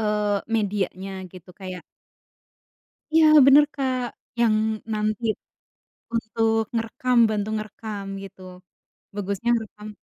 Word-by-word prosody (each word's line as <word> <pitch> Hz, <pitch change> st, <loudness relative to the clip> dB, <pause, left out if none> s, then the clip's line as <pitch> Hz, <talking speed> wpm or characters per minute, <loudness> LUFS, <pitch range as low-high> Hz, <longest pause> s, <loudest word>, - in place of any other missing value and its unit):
eee, 210 Hz, -1 st, +1 dB
medianya 195 Hz, -3 st, -2 dB
gitu, 180 Hz, 0 st, -14 dB
kayak 185 Hz, -2 st, -8 dB, 1.3 s
Iya 325 Hz, -, +7 dB, 0.2 s
bener 285 Hz, +2 st, +8 dB
Kak, 260 Hz, -2 st, -1 dB, 0.4 s
yang 225 Hz, -2 st, +4 dB, 0.4 s
nanti 215 Hz, +1 st, -1 dB, 0.9 s
untuk 225 Hz, 0 st, +1 dB
ngerekam, 230 Hz, +2 st, -1 dB
bantu 210 Hz, -1 st, -1 dB
ngerekam 215 Hz, -1 st, -6 dB, 0.2 s
gitu, 195 Hz, -1 st, -12 dB, 0.8 s
bagusnya 200 Hz, +3 st, -2 dB
ngerekam 215 Hz, -2 st, -6 dB
215 Hz, 95 wpm, -24 LUFS, 195-225 Hz, 1.3 s, bener